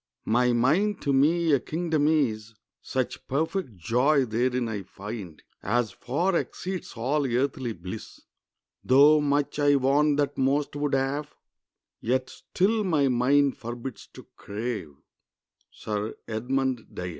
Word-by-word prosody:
] - - -50
"My 125 +2 +3
mind 160 - +2
to 140 - +1
me 160 +5 +3
a 140 - +4
kingdom 160 0 0
is; 115 -8 0 0.3
Such 130 -2 -3
perfect 150 - -2
joy 125 - +2
therein 125 +2 0
I 105 -3 -3
find 100 -3 -8 0.2
As 120 -2 0
far 170 +9 -1
exceeds 185 +2 -3
all 140 +5 0
earthly 125 -1 -1
bliss. 95 +4 -9 0.6
Though 145 +4 +6
much 145 0 0
I 145 0 +4
want 140 +2 +3
that 145 -1 -1
most 140 +2 +1
would 145 -1 0
have, 140 +3 -2 0.6
Yet 130 +2 -1
still 215 +4 0
my 155 -8 +2
mind 135 +3 +3
forbids 120 +1 -7
to - - -12
crave." 105 - -5 0.7
—SIR 105 0 -4
EDMUND 125 +2 -2
DYER. 90 0 -4
135 Hz, 135 wpm, -26 LUFS, 115-150 Hz, 0.7 s, Though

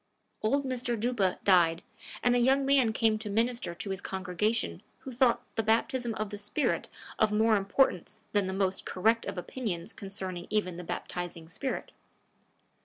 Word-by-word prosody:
Old 275 +6 +1
Mr. 245 -3 -2
Duppa 215 -5 +1
died, 175 -3 +4 0.4
and 245 0 +4
a - - +4
young 270 +3 +4
man 270 -4 +4
came 220 -1 +2
to 215 -1 -5
minister 230 -3 0
to 195 - -5
his 190 0 -2
congregation 190 +5 -1 0.2
who 265 - -7
thought 245 -1 +3
the 225 - +1
baptism 230 +2 +1
of 215 -1 -3
the 205 - -5
spirit 210 +8 -1 0.3
of 215 -1 +4
more 220 +1 +4
importance 200 0 +1
than 205 -2 +2
the - - -2
most 190 0 0
correct 225 +5 +1
of - - -4
opinions 185 -2 -4
concerning 190 -3 -6
even 190 -5 0
the 180 - -6
baptizing 175 -1 -5
spirit. 255 +11 -4
215 Hz, 165 wpm, -30 LUFS, 190-240 Hz, 0.4 s, died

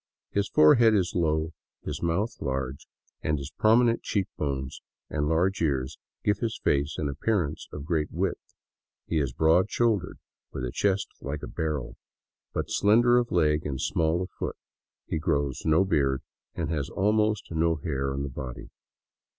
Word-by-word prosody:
His 100 0 0
forehead 110 +9 +6
is 95 -4 +1
low, 80 -1 +1 0.3
his - - -4
mouth 90 +7 0
large, 65 -1 -3 0.3
and 75 0 0
his 70 +1 -6
prominent 115 +2 +4
cheek 100 -3 0
bones 70 -2 -3 0.3
and 75 -1 0
large 90 +4 +1
ears 70 -5 -1 0.2
give 105 -1 +2
his 115 -2 -2
face 70 +1 +1
an 75 - -1
appearance 80 +2 -1
of 75 -1 -7
great 80 -2 0
width. 90 +2 -1 0.6
He 80 - 0
is 70 -4 0
broad 80 +9 +3
shouldered, 115 -5 +1 0.3
with 65 - -4
a - - -3
chest 100 +5 +1
like 70 +1 -5
a - - -4
barrel, 75 -5 -3 0.5
but - - -3
slender 120 +4 +5
of 120 -1 -1
leg 75 -1 +2
and 65 -2 -3
small 85 +2 +1
of 90 - -8
foot. - - -5 0.5
He 80 - -2
grows 70 -5 -1
no 80 +4 +4
beard, 70 -7 +1 0.3
and 80 -1 -2
has 75 -4 -2
almost 105 0 +1
no 80 0 +2
hair 70 -3 -2
on 70 +1 -2
the 70 - -3
body. 65 -2 -7
80 Hz, 165 wpm, -27 LUFS, 70-100 Hz, 0.6 s, forehead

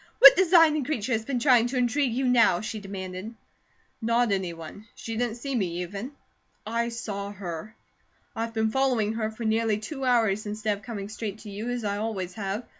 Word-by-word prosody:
What - - +11
designing 330 -5 +5
creature 255 -4 -2
has 220 -2 0
been 270 -1 -1
trying 245 -2 +4
to 255 - -5
intrigue 250 +2 +1
you 265 +1 0
now?" 235 -8 +4
she 215 0 -4
demanded. 195 +2 -7 0.7
"Not 230 0 +2
any 190 -3 0
one. 165 +6 -10
She 225 - -6
didn't 235 -1 -1
see 275 +3 -4
me, 180 -7 -1
even. 205 +9 -6 0.5
I 235 +2 -1
saw 205 -4 -5
her. 185 +1 -7 0.6
I've 230 0 -2
been 220 0 +1
following 245 -5 +1
her 220 -1 -1
for 220 +2 -8
nearly 220 -1 +1
two 270 +6 -6
hours 220 -5 +2
instead 210 0 -1
of 200 - -15
coming 200 -2 -5
straight 215 -1 -5
to 210 - -9
you, 210 +4 -4
as 245 -1 -3
I 205 -1 -1
always 200 -4 -3
have. 205 +2 -4
220 Hz, 190 wpm, -26 LUFS, 200-245 Hz, 0.7 s, What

